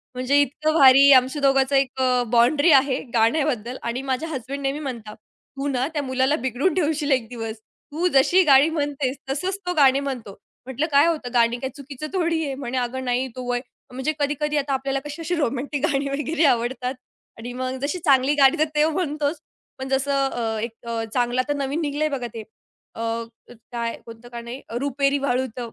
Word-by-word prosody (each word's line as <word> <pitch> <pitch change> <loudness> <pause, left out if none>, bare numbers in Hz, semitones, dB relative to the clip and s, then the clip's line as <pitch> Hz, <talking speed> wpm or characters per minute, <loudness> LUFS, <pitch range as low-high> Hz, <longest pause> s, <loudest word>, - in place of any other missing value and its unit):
म्हणजे 255 +3 +2
इतकं 305 +3 0
भारी 275 -2 +7
आमच्या 260 +3 +3
दोघांचं 270 0 +3
एक 270 -1 +1
अ, 250 -1 +2
बाउंडरी 285 +7 +4
आहे 270 -1 +4
गाण्याबद्दल 240 0 +1
आणि 235 +2 -3
माझ्या 270 +3 -2
हसबँड 270 -1 -5
नेहमी 275 +2 -2
म्हणतात, 235 -7 -6
"तू 275 +5 -9
ना 260 -1 0
त्या 295 - -1
मुलाला 260 +2 +1
बिघडून 260 +8 0
ठेवशील 300 -3 0
एक 255 -4 +1
दिवस. 225 -2 -6 0.3
तू 330 +5 0
जशी 290 +8 +5
गाणी 280 -1 +6
म्हणतेस 285 -4 -2
तसंच 365 +8 -2
तो 360 - -1
गाणी 275 -2 +5
म्हणतो." 260 -7 -5 0.3
म्हंटलं, 265 +4 -2
"काय 285 +2 +5
होतं, 300 -7 -2
गाणी 235 0 +3
काय 265 - -3
चुकीचं 285 +1 -8
थोडी 335 -3 0
आहे." 275 - -3
म्हणे, 260 -2 -4
"अगं 250 +1 -2
नाही 250 +1 0
तो 255 - -6
वय" 245 - 0 0.3
म्हणजे 265 +5 -2
कधी-कधी 295 +1 -1
आता 280 -1 -1
आपल्याला 270 +1 -1
कशी 295 +3 -7
अशी 350 +2 -2
रोमॅन्टिक 280 -1 -1
गाणी 275 0 0
वगैरे 300 +4 -1
आवडतात 250 +2 -3 0.4
आणि 240 +2 -7
मग 255 +1 -3
जशी 290 +6 -2
चांगली 270 0 +4
गाणी 275 +2 +5
तर 310 - +4
ते 300 0 +4
म्हणतोच 305 -2 -2 0.4
पण 265 - -5
जसं 275 0 +1
अ, 225 -3 -3
एक 230 +1 -3 0.2
अ, 230 -1 -2
चांगलं 245 0 0
आता 290 +3 -2
नवीन 290 +5 -2
निघालंय 295 +1 -1
बघा 255 -4 -3
ते 225 - -6 0.5
अ, - - -9 0.7
काय 235 -1 -3
कोणतं 230 +1 -12
गाणं 235 0 -8
आहे, 255 +3 -7 0.2
रुपेरी 280 +1 0
वाळूत, 255 -2 -2
270 Hz, 185 wpm, -23 LUFS, 250-290 Hz, 0.7 s, भारी